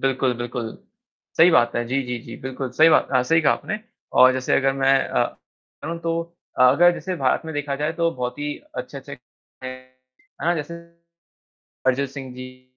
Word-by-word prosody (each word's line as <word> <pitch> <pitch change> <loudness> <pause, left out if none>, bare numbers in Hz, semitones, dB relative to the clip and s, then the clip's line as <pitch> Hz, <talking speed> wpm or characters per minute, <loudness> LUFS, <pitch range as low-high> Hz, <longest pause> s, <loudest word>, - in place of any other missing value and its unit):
बिल्कुल, 130 -1 +1
बिल्कुल, 120 -1 -4 0.6
सही 165 +2 +7
बात 120 -8 +3
है। 120 - 0
जी, 135 +3 0
जी, 125 -1 -4
जी, 115 - -9
बिल्कुल 130 0 -5
सही 155 +6 +5
बात 160 - +4
अ, 130 -1 +4
सही 165 +6 +3
कहा 145 - +4
आपने। 210 +1 -4 0.4
और 130 0 +8
जैसे 130 0 +1
अगर 135 0 +2
मैं 135 0 +3
अ, - - +2 0.6
कहूँ 170 +1 -4
तो 165 0 -1 0.4
अ, - - +5
अगर 175 +6 +5
जैसे 185 +1 -4
भारत 130 -5 +1
में 160 - -6
देखा 145 -1 -2
जाए 150 +2 -1
तो 165 0 +1
बहुत 125 -2 -4
ही 145 0 -3 0.2
अच्छे-अच्छे 140 0 -7 0.5
हैं, 130 - -4 0.7
है - - -1
ना, 175 - +3
जैसे 160 +1 -5 1.1
अरिजीत 130 +1 +1
सिंह 135 -2 -8
जी। 130 0 -11
135 Hz, 190 wpm, -23 LUFS, 130-160 Hz, 1.1 s, और